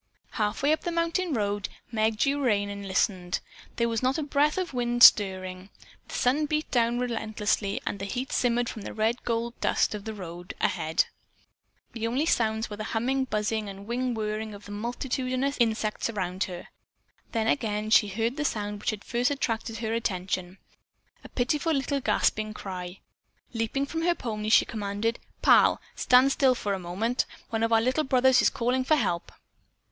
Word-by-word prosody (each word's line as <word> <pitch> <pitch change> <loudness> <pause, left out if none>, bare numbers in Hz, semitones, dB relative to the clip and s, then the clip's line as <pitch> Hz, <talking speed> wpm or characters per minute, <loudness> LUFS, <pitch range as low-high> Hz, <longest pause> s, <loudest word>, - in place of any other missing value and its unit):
Half 210 +2 -1
way 290 - +4
up 315 - -1
the 345 - -3
mountain 335 +1 0
road 205 -2 -1 0.2
Meg 220 -1 +1
drew 280 +4 +1
rein 205 -4 +1
and 200 0 -6
listened. 185 -2 0 0.4
There 235 - +1
was 230 -1 -1
not 260 +3 +1
a 310 - -1
breath 295 +2 +2
of 365 -5 -2
wind 240 -1 +2
stirring. 185 -2 +5 0.4
The - - -7
sun 290 +5 +2
beat 305 +1 -2
down 235 -1 +2
relentlessly 220 -4 -1
and 200 - -3
heat 245 +7 -3
shimmered 245 -1 +1
from 220 - -6
the - - -7
red 220 +3 0
gold 235 0 -1
dust - - +2
of 210 -1 -6
the 220 -1 -5
road 175 -2 -8
ahead. 160 +1 +1 0.9
The 230 -1 -2
only 260 +7 0
sounds 220 -6 +1
were 210 - -7
the 215 - -4
humming, 260 +4 +1
buzzing 215 -2 -1
and 195 0 -9
wing 245 +2 -1
whirring 215 0 -3
of 205 - -13
the 205 - -9
multitudinous 255 +5 -2
insects 220 -2 0
all - - -5
about 185 +1 -1
her. 180 -2 -8 0.6
Then 225 -2 0
again 215 -3 0
she 210 -1 +6
heard 225 +6 -2
the 300 - -1
sound 210 -6 -2
which - - -1
had 215 -2 -4
first 245 +1 0
attracted 230 -5 -2
her 220 0 -2
attention. 185 -4 -2 0.7
A - - -11
pitiful 295 +6 0
little 275 0 0
gasping 215 -1 +1
cry. 180 -2 -7 0.5
Leaping 230 +4 -1
from 325 +3 -4
her 345 +1 +2
pony, 215 -5 -4
she - - +6
commanded: 215 +2 -2 0.2
"Pal, - - +6 0.2
stand 255 +2 +5
still 265 -2 +3
for 205 -4 -2
a 195 - -2
moment. 195 +8 -1 0.2
One 225 -1 -1
of 230 0 +1
our 225 -1 +5
little 255 +6 +1
brothers 260 -1 +4
is - - +4
calling 250 +2 0
for 310 +4 +3
help." 170 - -1
225 Hz, 185 wpm, -27 LUFS, 205-255 Hz, 0.9 s, she